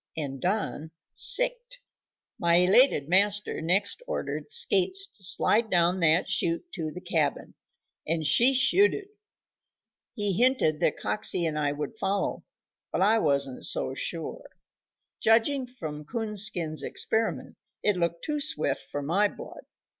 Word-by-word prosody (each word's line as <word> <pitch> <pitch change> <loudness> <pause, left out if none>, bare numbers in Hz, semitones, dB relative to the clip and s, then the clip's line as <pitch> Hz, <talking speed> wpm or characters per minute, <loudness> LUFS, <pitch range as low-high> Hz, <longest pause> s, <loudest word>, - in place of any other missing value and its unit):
and 135 -4 -4
Don 180 -5 -2 0.2
sicked. - - +1 0.6
My 170 -1 +2
elated 180 - +4
master 200 +1 +1
next 195 - 0
ordered - - -4
Skates 390 -4 +1
to 215 - -12
slide 220 +4 +2
down 175 0 +2
that 165 +1 +2
chute 170 - -1
to 160 -3 -4
the 175 - -8
cabin, 165 -5 -2 0.5
and 160 0 -1
she 240 - +4
shooted. 395 +9 +3 1.1
He 205 -4 -1
hinted 235 - +2
that 170 - 0
Coxey 180 -4 0
and 155 -2 -2
I 145 -1 0
would 150 +10 -6
follow, 195 +1 -2 0.5
but - - 0
I 220 +3 +4
wasn't 140 -6 -1
so - - 0
sure. 165 +4 -5 0.7
Judging 250 +4 +2
from 155 -12 -8
Coonskin's 200 - 0
experiment, 220 +9 -2 0.3
it 210 - +2
looked 170 -1 -2
too 300 -1 -2
swift 150 - +1
for 145 - -4
my 190 +8 +2
blood. - - -11
190 Hz, 130 wpm, -27 LUFS, 160-230 Hz, 1.1 s, elated